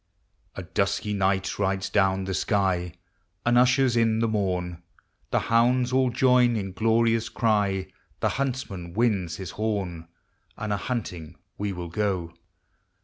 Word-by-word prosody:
The 95 - -5
dusky 100 +3 -1
ni2,ht 95 -1 0
rides 95 -1 0
down 95 -1 +2
the 95 0 -3
sky, 90 -4 0 0.5
And 120 0 +3
ushers 125 0 +4
in 115 -1 +3
the 115 0 +1
morn: 90 -5 -2 0.5
The - - +1
hounds 120 +2 +2
all 130 -1 +3
join 125 -1 +4
in 95 -3 -3
glorious 115 +2 +2
cry, 105 -5 +1 0.3
The - - +1
huntsman 125 -11 -3
winds 100 -8 +1
his 95 -3 -6
horn, 95 -7 -3 0.5
And 105 -1 -2
a - - 0
hunting 90 -8 -4 0.2
we 100 0 -1
will 90 -2 -6
go. 90 -3 -2
105 Hz, 140 wpm, -26 LUFS, 95-115 Hz, 0.5 s, ushers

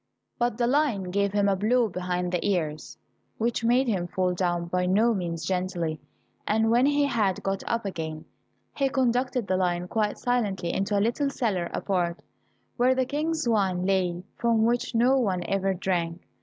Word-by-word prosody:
But 240 -2 0
the 240 - +1
lion 240 -9 +1
gave 200 +1 +1
him 205 0 +2
a 200 - +3
blow 230 +5 +2
behind 180 -1 -2
the 180 - -1
ears, 155 -6 -2 0.4
which 230 0 -1
made 245 +3 +3
him 185 -6 0
fall 180 0 0
down 175 -1 -1
by 180 +1 -1
no 220 +5 +3
means 170 -4 -3
gently, 180 -4 -2 0.5
and 220 +1 +2
when 245 +3 +4
he 290 0 +3
had 215 -8 0
got 195 0 -1
up 230 -2 -1
again, 160 -5 -5 0.5
he 275 -1 +1
conducted 250 -2 0
the 185 -1 0
lion 180 -1 0
quite 210 0 -1
silently 210 -8 -1
into 200 +1 0
a 200 - +2
little 275 +5 0
cellar 205 -11 -1
apart, 175 -3 -1 0.5
where 255 +1 +3
the 260 0 +1
King's 310 +2 -1
wine 190 -5 +1
lay, 180 -2 0 0.2
from 230 -2 +3
which 240 +1 0
no 255 +4 +4
one 190 -7 0
ever 195 +1 0
drank. 175 -2 -1
200 Hz, 175 wpm, -26 LUFS, 180-240 Hz, 0.5 s, when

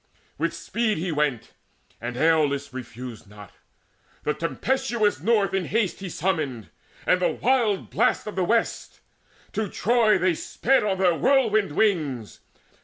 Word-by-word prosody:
With - - -1
speed 230 -2 -1
he 175 +2 -2
went, 150 -6 -1 0.5
and 120 +1 -5
Aeolus 145 -3 +2
Refused 120 -3 -8
not: 105 -2 -13 0.7
the 150 - 0
tempestuous 215 - 0
North 210 -4 +2
in 190 -2 0
haste 210 +1 0
He 190 -1 -6
summoned, 155 - -2 0.3
and 180 - +3
the - - +3
wild 235 -6 +1
blast - - +1
of 210 - -6
the 190 - +1
West; 230 +5 -1 0.4
And - - -33
to 215 -1 -2
Troy 210 -6 +3
sped 265 +10 +1
they 210 - 0
on 190 - 0
their 185 -2 +3
whirlwind 215 - +2
wings. 150 - 0
185 Hz, 145 wpm, -25 LUFS, 145-215 Hz, 0.7 s, and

